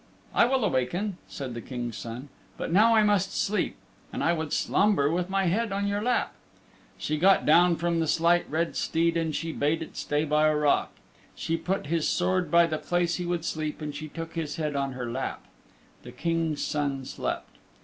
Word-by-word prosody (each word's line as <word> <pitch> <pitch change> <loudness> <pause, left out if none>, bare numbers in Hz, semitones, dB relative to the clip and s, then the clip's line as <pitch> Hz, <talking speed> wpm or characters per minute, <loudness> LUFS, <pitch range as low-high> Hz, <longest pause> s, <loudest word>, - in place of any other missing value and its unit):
"I - - +5
will 260 0 +1
awaken," 175 +9 -1
said 135 -3 -6
the 120 - -6
King's 120 -3 -5
Son, 120 +5 -7 0.3
"but - - -4
now 225 +4 +6
I 215 - +5
must 205 -2 +1
sleep, 210 +1 0 0.4
and - - -3
I 170 - +3
would 160 -3 -3
slumber 195 -9 +2
with 180 +2 -1
my 195 0 +1
head 210 +5 0
on 200 +1 -1
your 200 0 -1
lap." 245 +3 0 0.6
She 155 0 -2
got 190 +3 +5
down 170 +3 +5
from 170 0 0
the 160 - 0
Slight 170 +3 +2
Red 165 +3 -1
Steed 165 +1 +1
and 165 -2 -1
she 165 -1 -2
bade 160 +2 0
it - - -12
stay 150 +1 -1
by 150 0 +3
a 155 - +2
rock; 150 -1 +2 0.5
she 165 - -2
put 180 +3 -2
his 160 +1 0
sword 185 0 +1
by 170 0 +6
the 155 -2 -2
place 175 -1 0
he 180 -1 -4
would 175 -2 -2
sleep 155 -2 -3
and 150 -1 -5
she 155 +2 -6
took 165 +2 -7
his 155 -3 -3
head 155 -2 -2
upon 140 -1 -1
her 125 -1 -5
lap. 120 +3 -4 0.6
The - - -10
King's 165 -2 -1
Son 140 -3 -2
slept. - - -4
165 Hz, 200 wpm, -27 LUFS, 150-180 Hz, 0.6 s, now